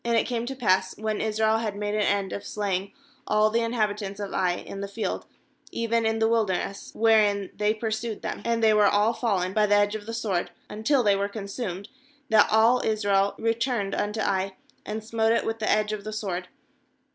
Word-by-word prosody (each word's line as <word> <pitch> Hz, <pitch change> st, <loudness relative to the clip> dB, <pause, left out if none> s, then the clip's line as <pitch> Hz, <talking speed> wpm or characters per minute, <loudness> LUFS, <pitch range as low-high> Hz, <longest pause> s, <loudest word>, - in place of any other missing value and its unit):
it 235 Hz, -1 st, +2 dB
came 240 Hz, -1 st, -2 dB
to 270 Hz, -, -4 dB
pass, 190 Hz, -6 st, +1 dB
when 215 Hz, 0 st, -2 dB
Israel 220 Hz, 0 st, +1 dB
had 215 Hz, -3 st, -3 dB
made 205 Hz, 0 st, -3 dB
an 215 Hz, -, +1 dB
end 200 Hz, -1 st, 0 dB
of 200 Hz, -, -5 dB
slaying 195 Hz, -2 st, -2 dB, 0.4 s
all 215 Hz, 0 st, +3 dB
the 230 Hz, -, +2 dB
inhabitants 210 Hz, -3 st, -2 dB
of 200 Hz, -1 st, -5 dB
Ai 180 Hz, -1 st, +1 dB
in 195 Hz, -, -7 dB
the 200 Hz, -, -3 dB
field, 200 Hz, -1 st, -4 dB, 0.4 s
even 230 Hz, 0 st, 0 dB
in 220 Hz, 0 st, 0 dB
the 225 Hz, 0 st, +2 dB
wilderness 210 Hz, -4 st, -1 dB
wherein 210 Hz, -3 st, +3 dB
they 210 Hz, 0 st, +2 dB
pursued 220 Hz, 0 st, -3 dB
them, -, -, -4 dB
and 230 Hz, -1 st, 0 dB
they 220 Hz, -1 st, +6 dB
were 210 Hz, -1 st, +5 dB
all 210 Hz, +3 st, +3 dB
fallen 190 Hz, -6 st, -1 dB
by 210 Hz, 0 st, +3 dB
the 205 Hz, -, +4 dB
edge 205 Hz, 0 st, +3 dB
of 215 Hz, -1 st, -6 dB
the 230 Hz, -, -4 dB
sword, 200 Hz, -6 st, -1 dB, 0.2 s
until 240 Hz, +5 st, +1 dB
they 205 Hz, -2 st, +4 dB
were 200 Hz, +1 st, -1 dB
con 205 Hz, 0 st, -6 dB
sumed, 200 Hz, -2 st, -5 dB, 0.4 s
that 215 Hz, -3 st, +5 dB
all 225 Hz, +3 st, +5 dB
Israel 200 Hz, -2 st, +1 dB
returned 230 Hz, -2 st, -1 dB
unto 210 Hz, +1 st, -1 dB
Ai, 190 Hz, -1 st, 0 dB, 0.3 s
and 215 Hz, +1 st, -4 dB
smote 225 Hz, 0 st, +1 dB
it -, -, +1 dB
with 225 Hz, 0 st, -2 dB
the 215 Hz, -, -1 dB
edge 215 Hz, 0 st, +1 dB
of 210 Hz, -1 st, -5 dB
the 215 Hz, -, -5 dB
sword. 185 Hz, -4 st, -3 dB
215 Hz, 205 wpm, -26 LUFS, 200-225 Hz, 0.4 s, they